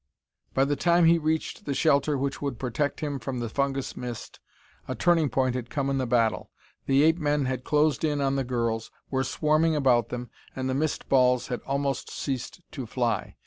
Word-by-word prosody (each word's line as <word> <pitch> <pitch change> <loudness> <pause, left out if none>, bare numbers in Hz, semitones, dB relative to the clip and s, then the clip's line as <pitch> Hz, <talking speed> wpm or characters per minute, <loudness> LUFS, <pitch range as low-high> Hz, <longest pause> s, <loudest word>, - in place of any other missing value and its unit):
By 135 - +4
the 145 +1 0
time 170 +3 +3
he 165 +1 +5
reached 160 0 -2
the 140 - -2
shelter 145 -1 +3
which 135 +1 -2
would 140 -4 -3
protect 135 +3 -2
him 145 -3 -2
from 130 -1 -4
the 120 -1 -3
fungus 140 +2 -1
mist, 120 -2 -7 0.5
a - - -3
turning 165 -4 +3
point 130 +1 +1
had 125 -2 -4
come 140 -2 -1
in 135 - 0
the 130 - -1
battle. 115 -2 +1 0.4
The 135 +1 +4
ape 160 +2 +4
men 145 -2 +1
had 130 -1 -2
closed 150 -2 +2
in 150 -2 +1
on 135 -1 +1
the 135 - 0
girls, 115 -3 -2 0.2
were 135 -1 +1
swarming 155 +4 +2
about 125 -6 +3
them, 125 -1 -6 0.2
and 130 0 -2
the 130 - 0
mist 150 +3 -1
balls 125 -2 +3
had 125 - -3
almost 140 -1 -1
ceased 135 +6 -4
to 130 -5 -6
fly. 120 0 -1
135 Hz, 200 wpm, -27 LUFS, 125-150 Hz, 0.5 s, he